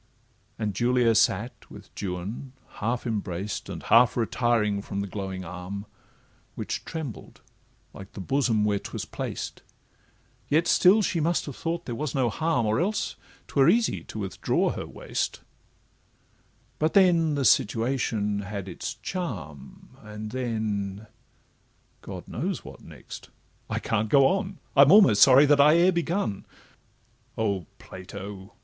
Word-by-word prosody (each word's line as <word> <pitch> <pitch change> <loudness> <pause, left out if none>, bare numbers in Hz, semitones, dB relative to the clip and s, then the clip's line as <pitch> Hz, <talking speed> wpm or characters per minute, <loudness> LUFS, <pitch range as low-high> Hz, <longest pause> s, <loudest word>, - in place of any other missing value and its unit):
And 105 -2 -2
Julia 120 +2 +2
sate 110 +2 0
with - - -13
Juan, 100 +7 -5 0.3
half 120 +4 -1
embraced 100 -3 -3
And - - -6
half 120 +1 +5
retiring 115 -3 +1
from 100 0 -4
the 100 - -4
glowing 95 -1 -5
arm, 90 +3 -7 0.7
Which - - -4
trembled 155 -9 -7 0.5
like 95 0 -11
the - - -8
bosom 115 0 +1
where 100 -1 +1
'twas - - -6
placed; - - -5 0.9
Yet 160 +3 +2
still 200 +4 +5
she 170 - 0
must 165 +2 +1
have 140 - -7
thought 170 +1 -3
there 120 - -4
was 145 +2 -3
no 130 -3 +1
harm, 160 -7 0
Or 110 +3 +1
else 205 +5 -1 0.3
'twere 140 +2 +3
easy 225 +4 +2
to - - -9
withdraw 100 -3 0
her - - -6
waist; - - -4 1.4
But 155 +4 0
then 170 -5 +4
the 140 -2 0
situation 110 -2 +1
had 100 -1 -5
its 120 +8 -5
charm, 90 - -6
And 105 0 -8
then—God 110 -3 -7
knows - - -3
what - - -11
next—I - - -10
can't 110 +1 -1
go 140 +3 +6
on; 190 +4 0 0.2
I'm 140 +2 +7
almost 185 - +7
sorry 135 +2 +8
that 145 0 +5
I 150 +2 +6
e'er 175 +2 +5
begun. 170 - -2 0.9
O 100 -6 -1
Plato! 95 +2 -9
115 Hz, 135 wpm, -26 LUFS, 100-145 Hz, 1.4 s, sorry